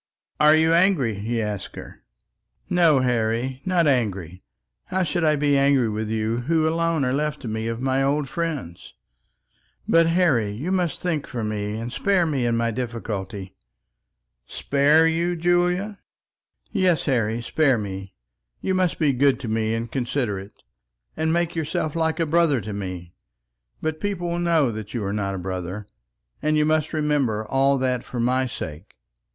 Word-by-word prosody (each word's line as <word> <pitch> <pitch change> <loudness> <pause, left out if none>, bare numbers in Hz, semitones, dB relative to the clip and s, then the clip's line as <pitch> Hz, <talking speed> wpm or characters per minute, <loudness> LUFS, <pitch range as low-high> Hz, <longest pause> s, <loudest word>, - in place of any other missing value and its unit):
"Are 150 +1 +6
you 160 +1 +3
angry?" 170 - +3
he 115 +3 -2
asked 105 -2 -5
her. - - -10 0.7
"No, 165 -6 +4
Harry; 120 +1 0
not 180 -2 +3
angry. 100 - 0 0.4
How 190 0 0
should 175 +1 -1
I 155 -1 +4
be 145 -1 +2
angry 140 -4 +3
with 110 0 -3
you 110 +1 -1
who 160 +5 +1
alone 165 -2 +1
are 125 - 0
left 150 +1 -1
to 125 - -6
me 110 +1 -3
of 115 0 -3
my 135 0 +1
old 140 +1 +1
friends? 145 - -5 0.9
But, 165 0 +5
Harry, 165 - +2
you 145 - -4
must 180 -5 0
think 165 -5 -2
for 120 -3 -4
me, 105 0 -3
and 120 +2 -5
spare 195 +1 +2
me 135 -6 0
in 115 -1 +1
my 115 0 0
difficulty." 105 -5 -5 0.9
"Spare 145 +3 +3
you, 170 +2 0
Julia?" 180 +4 +1 0.7
"Yes, 185 -7 +2
Harry, 115 -4 +1
spare 135 +2 +2
me; 95 -2 -6 0.4
you 190 - -1
must 185 -2 +1
be 150 -4 +2
good 135 +1 +3
to 120 - -5
me 110 0 0
and 115 0 -4
considerate, 120 -7 -3 0.5
and 160 0 0
make 170 0 0
yourself 155 -1 -2
like 160 0 0
a 165 - +2
brother 160 -3 +3
to 105 - -6
me. 90 -3 -6 0.7
But 155 0 -2
people 185 -3 -2
will 170 - -1
know 165 -6 +2 0.2
you 110 0 -4
are 100 - -2
not 100 -2 -2
a - - -4
brother, 95 +2 -5 0.6
and 155 +1 +1
you 150 - +3
must 155 0 +1
remember 145 -9 0
all 135 +4 +2
that, 130 -2 0
for 125 - -6
my 130 +2 +1
sake. 80 -5 -7
135 Hz, 165 wpm, -23 LUFS, 110-160 Hz, 0.9 s, Are